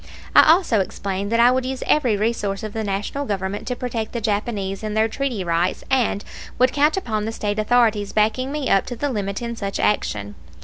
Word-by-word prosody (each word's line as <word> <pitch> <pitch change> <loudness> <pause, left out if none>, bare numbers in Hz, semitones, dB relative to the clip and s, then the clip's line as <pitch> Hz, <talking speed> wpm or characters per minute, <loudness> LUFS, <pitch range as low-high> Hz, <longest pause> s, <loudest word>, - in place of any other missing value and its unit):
I - - +8
also 330 - +3
explained 195 +1 -3
that 230 - +2
I 240 +1 +7
would 260 0 +1
use 260 0 -4
every 245 -8 +2
resource 210 -2 -1
of 215 -1 -5
the 220 - -2
National 205 +7 -2
Government 200 -4 -3
to 250 - -1
protect 235 -3 -4
the 235 - -2
Japanese 205 -2 -2
in 215 -1 -4
their 220 0 +3
treaty 240 -4 -2
rights, 170 +1 0
and 240 -5 +1 0.3
would 255 0 +3
count 300 +4 +3
upon 215 - -2
the 225 - -2
State 210 -1 -2
authorities 215 -2 +2
backing 220 +5 +1
me 295 -2 -2
up 195 - +2
to 245 - -4
the 285 +4 -2
limit 200 -1 -3
in 235 0 -4
such 200 -3 -4
action. 105 - 0
220 Hz, 210 wpm, -22 LUFS, 200-250 Hz, 0.3 s, I